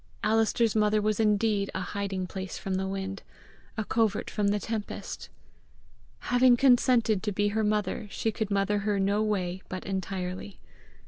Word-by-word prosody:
Alister's 225 +1 +2
mother 215 0 +3
was 215 +1 0
indeed 210 -2 +2
a - - -1
hiding 195 0 -3
place 190 +1 -6
from 195 - -4
the 190 +1 -1
wind, 195 0 -4 0.6
a 215 - -1
covert 220 -2 0
from 210 -2 0
the 205 +1 +2
tempest! 220 -1 -5 1.0
Having 245 0 +6
consented 245 -5 +4
to 210 - -2
be 205 +1 +1
her 220 +1 0
mother, 210 0 -1
she 225 - -1
could 220 -1 -3
mother 200 +1 +1
her 205 0 0
no 200 +2 +2
way 190 -4 -1
but 185 0 -5
entirely. 190 0 -4
205 Hz, 155 wpm, -28 LUFS, 195-220 Hz, 1.0 s, Having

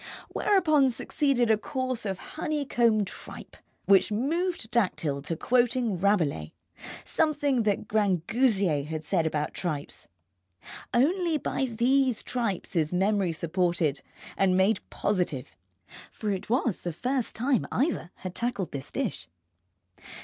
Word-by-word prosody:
Whereupon 310 -9 +3
succeeded 250 -1 +1
a 215 - +3
course 255 -1 -2
of 190 -1 -2 0.2
honeycomb 245 -9 +1
tripe, - - -10 0.3
which 195 +2 +5
moved 315 - -1
Dactyl 165 -11 0
to 155 +3 -3
quoting 240 +1 +1
Rabelais, 165 - +1 0.5
something 290 -5 +1
that 205 -2 0
Grangousier 200 - +2
had 155 0 -4
said 165 0 +1
about 150 -1 -2
tripes. 155 -5 -4 0.8
Only 330 +5 +2
by 270 - -1
these 255 +1 +1
tripes 230 -9 -3
is 155 -2 +1
memory 190 0 +1
supported 170 -3 0 0.3
and 185 -1 +3
made 195 +4 +3
positive, 175 -9 -2 0.6
for 210 -2 -3
it 190 +1 -4
was 240 -4 +1
the 175 - -4
first 250 - -2
time 255 +1 +1
either 270 - 0
had 185 -1 -7
tackled 235 -7 -2
this 135 -2 -6
dish. - - -3
215 Hz, 120 wpm, -27 LUFS, 175-255 Hz, 0.8 s, which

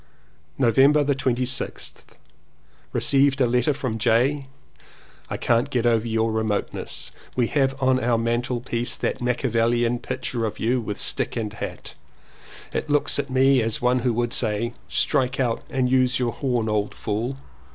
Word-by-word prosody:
November 135 +4 +4
26th. 130 -2 -2 0.8
Received 140 0 +3
a 130 - +4
letter 125 +3 +2
from 130 -5 -3
J. 130 +5 +2 0.8
"I - - -3
can't 120 +4 +1
get 125 -4 0
over 115 -1 +2
your 110 0 0
remoteness. 110 -2 -3 0.2
We 125 - +2
have 135 -2 +1
on 130 -1 +2
our 120 -1 +2
mantel 120 +1 -1
piece 120 -1 -1
that - - -2
Machiavellian 120 -1 +1
picture 120 0 -3
of 110 - -4
you 120 +3 +1
with 105 -2 -4
stick - - 0
and 110 -3 -3
hat. - - -6 0.8
It - - -3
looks 145 0 +1
at 140 -1 -2
me 130 0 +4
as 110 0 -1
one 125 +1 +2
who 120 -2 0
would 120 0 0
say, 115 +1 0 0.2
'Strike 130 -4 +1
out 120 -3 0
and 130 -1 0
use 130 0 +2
your 125 -2 0
horn 125 -5 -1
old 105 -1 -1
fool.' 115 +6 -3
125 Hz, 150 wpm, -23 LUFS, 115-130 Hz, 0.8 s, November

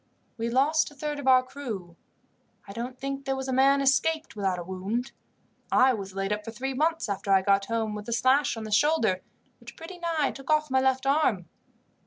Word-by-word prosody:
We 230 0 -3
lost 285 +6 +2
a 290 - -17
third 295 +1 -4
of 275 - -6
our 255 -1 +6
crew. 225 -11 -7 0.7
I 200 - -8
don't 245 +3 -5
think 275 0 -4
there 270 - 0
was 265 0 -5
a 260 - -1
man 275 +2 +4
escaped 310 +3 +1
without 195 -3 -1
a 175 - -5
wound. 195 +8 -3 0.6
I 260 0 +5
was 195 -4 -6
laid 195 +1 -1
up 210 0 -4
for 225 - -7
three 260 +4 -4
months, 325 +3 0
after 200 -1 -3
I 190 -1 +5
got 195 0 +2
home, 225 -1 -2
with 210 +1 -7
a - - -1
slash 260 +2 +2
on 225 - -5
the 215 - -7
shoulder, 220 -7 +2 0.4
which - - -12
pretty 350 +2 -10
nigh 330 -4 0
took 270 +1 -12
off 305 -2 +2
my 260 0 +3
left 265 0 +1
arm. 270 - +2
255 Hz, 215 wpm, -27 LUFS, 210-280 Hz, 0.7 s, our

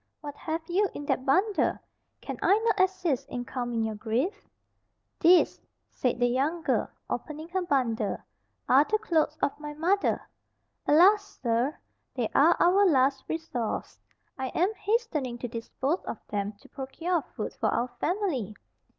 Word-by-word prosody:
"What 290 -1 -6
have 320 +1 -4
you 385 +3 +2
in 290 - -5
that 260 -1 -1
bundle? 390 +10 +2 0.4
Can - - -5
I 400 - +5
not 440 -3 +2
assist 355 -8 +1
in 245 -1 -4
calming 240 -2 -2
your 220 0 -1
grief?" 250 - -2 0.7
"These," 350 +2 +5 0.3
said 250 -2 -1
the 245 - +4
young 280 +7 0
girl, - - +1 0.2
opening 310 +1 -5
her 375 +1 -1
bundle, 245 - 0 0.5
"are 270 +3 +6
the 430 +7 +1
clothes 320 -8 0
of 280 +1 0
my 295 0 -7
mother: 365 +6 +1 0.6
alas, 400 +6 +5
sir, 240 +5 +1 0.4
they - - 0
are - - +5
our 375 +3 +5
last 270 -3 +3
resource. 315 -9 -3 0.4
I 265 - -1
am 370 +6 +2
hastening 400 - -1
to 245 - -4
dispose[Pg 255 +7 -3
57] - - -3
of - - -4
them 205 0 -2
to 205 - -20
procure 330 +6 -2
food - - -4
for - - 0
our 245 +1 0
family. 325 - -1
295 Hz, 155 wpm, -28 LUFS, 250-365 Hz, 0.7 s, are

